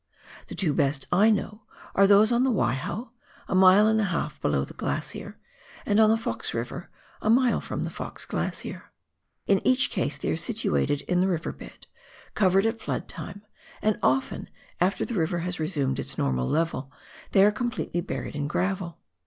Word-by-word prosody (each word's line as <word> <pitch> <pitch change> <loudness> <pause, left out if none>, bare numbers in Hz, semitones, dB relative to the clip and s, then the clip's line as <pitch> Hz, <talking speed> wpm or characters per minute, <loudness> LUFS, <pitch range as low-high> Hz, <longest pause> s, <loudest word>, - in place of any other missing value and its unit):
The - - -8
two 165 -7 +1
best 140 0 0
I 200 +5 +5
know 210 0 -1 0.3
are 195 0 +5
those 205 +3 +6
on 240 0 +3
the 265 - +3
Waiho, 180 - -1 0.4
a - - -3
mile 190 +2 +7
and 220 0 +3
a - - +1
half 165 -5 -3
below 70 -2 +1
the - - -12
glacier, - - -4 0.5
and 205 +1 +2
on 215 -1 +6
the 225 - +4
Fox 115 - -3
River, 120 +9 -5 0.3
a 215 - 0
mile 245 +2 +4
from - - -4
the - - -4
Fox - - -6
Glacier. - - -4 0.5
In 195 -2 +3
each 255 0 +3
case 150 -7 -1
they - - -2
are - - +1
sitiiated 170 -5 0
in 180 0 0
the 190 - +3
river 170 -4 -1
bed, - - -13 0.5
covered 195 +1 +3
at 225 0 0
flood - - -3
time, 200 +1 -7 0.4
and 215 -1 0
often 130 +1 0 0.3
after 185 +3 +1
the 240 - -5
river 175 -3 0
has 180 -1 -3
resumed 145 -5 -1
its - - -3
normal 65 -2 0
level, 150 -4 -1 0.4
they 195 0 +7
are 210 - +5
completely 225 -6 -2
buried 170 - -5
in 145 -1 -2
gravel. 185 +1 -2
185 Hz, 185 wpm, -26 LUFS, 150-215 Hz, 0.5 s, mile